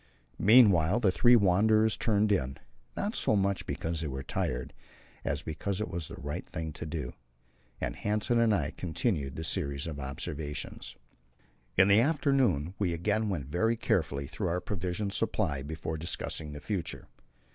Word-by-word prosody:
Meanwhile 100 -4 +6
the 100 -5 +4
three 105 +8 +6
wanderers 110 +2 +4
turned 105 -1 +2
in 70 -8 0 0.4
not 205 +2 -1
so 110 - +1
much 100 -1 0
because 80 -1 -2
they 80 - -2
were 65 -1 -4
tired, 60 -1 -2 0.5
as 70 +1 -2
because 95 +5 -3
it 110 - -2
was 85 -3 -3
the - - -8
right 75 +2 -5
thing 80 -1 -4
to 80 - -6
do 75 -5 -4 0.7
and - - -3
Hanssen 105 +3 0
and 115 -1 +4
I 75 -7 +1
continued 80 - -2
the 80 - -4
series 70 -3 -1
of 80 -4 -5
observations. 70 -1 -5 0.8
In 95 +1 +7
the 100 +2 +6
afternoon 135 - +2
we 90 -5 +1
again 105 +5 0
went 80 -9 -2
very 110 - +1
carefully 70 -9 0
through 95 +7 -3
our 85 +1 0
provision 90 +2 -3
supply 95 -9 0
before 80 +2 -4
discussing 80 -2 -4
the 75 - -7
future. 100 -6 -4
90 Hz, 160 wpm, -30 LUFS, 75-105 Hz, 0.8 s, In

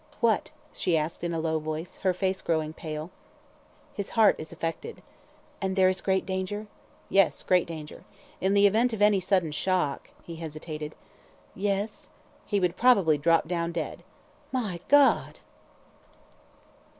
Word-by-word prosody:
"What?" 230 -3 +2 0.2
she 170 -3 +1
asked 155 +2 -3
in 170 - -1
a 165 - -2
low 160 0 0
voice, 155 +2 -5
her 190 - +1
face 185 +1 -1
growing 155 -2 -1
pale. 155 +1 -6 0.8
"His 200 -1 -4
heart 220 -2 +6
is 155 - -8
affected." 165 - -5 0.6
"And 190 -1 -1
there 190 -1 +5
is 185 0 -2
great 190 -1 +1
danger?" 190 +3 -3 0.4
"Yes, 195 -3 +3
great 180 -1 +3
danger. 155 -3 -8 0.4
In 195 +2 +1
the 200 0 +6
event 225 +4 +3
of 215 - -4
any 210 -2 +5
sudden 185 -3 +1
shock 165 -2 -1
" - - -27
he 165 -1 -8
hesitated. 155 -1 -6 0.6
"Yes 200 +2 -2 0.2
" - - -31
"He 205 - +1
would 180 -2 0
probably 195 -12 +4
drop 165 +2 +3
down 170 -1 -2
dead." 165 -2 -4 0.5
"My 215 -9 -2
God!" 285 -1 +4
180 Hz, 150 wpm, -27 LUFS, 160-200 Hz, 0.8 s, heart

